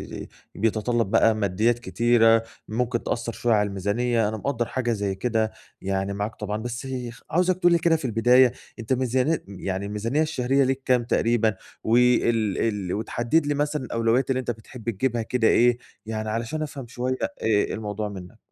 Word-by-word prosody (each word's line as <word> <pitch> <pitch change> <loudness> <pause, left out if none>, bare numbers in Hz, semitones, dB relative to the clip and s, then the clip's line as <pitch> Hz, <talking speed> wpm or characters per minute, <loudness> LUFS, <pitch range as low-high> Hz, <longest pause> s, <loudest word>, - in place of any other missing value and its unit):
ي - - -6
ي - - -10 0.3
بيتطلب 115 +1 0
بقى 110 -1 +4
ماديات 110 +4 +1
كتيرة 115 +1 +3 0.2
ممكن 120 +2 -1
تأثر 120 -1 -2
شوية 120 -2 +1
على 105 0 +2
الميزانية، 105 +3 0
أنا 110 - -4
مقدّر 120 0 -1
حاجة 120 -2 -2
زي 100 -3 -1
كده 110 +1 0 0.3
يعني 95 +1 -2
معاك 105 +2 -3
طبعًا، 105 0 -4
بس 120 +2 -5
يخ 125 -3 -6
عاوزك 180 +2 +2
تقول 175 -1 +4
لي 170 - +5
كده 165 0 +3
في 155 -4 -4
البداية 120 +2 +5 0.3
أنت 115 +3 -1
ميزاني 130 +5 +1
يعني 95 0 -4
الميزانية 115 +8 -1
الشهرية 135 -3 +1
ليك 135 +1 0
كام 125 -2 +3
تقريبًا؟ 115 -2 +1 0.3
وال 115 -3 +3
ال 100 -5 -1
وتحدد 120 +8 0
لي 145 - +1
مثلًا 145 -1 -1
الأولويات 115 +3 +1
اللي 130 -1 +1
أنت 120 - -2
بتحب 115 +1 -8
تجيبها 120 +2 -1
كده 115 0 +1
إيه، 120 0 +4 0.3
يعني 110 -1 -3
علشان 115 +8 -3
أفهم 140 -5 -6
شوية 125 +2 -2
آآ، - - 0 0.2
إيه 105 -2 +2
الموضوع 105 -1 -4
منّك. 90 -3 -10
115 Hz, 180 wpm, -24 LUFS, 110-125 Hz, 0.3 s, لي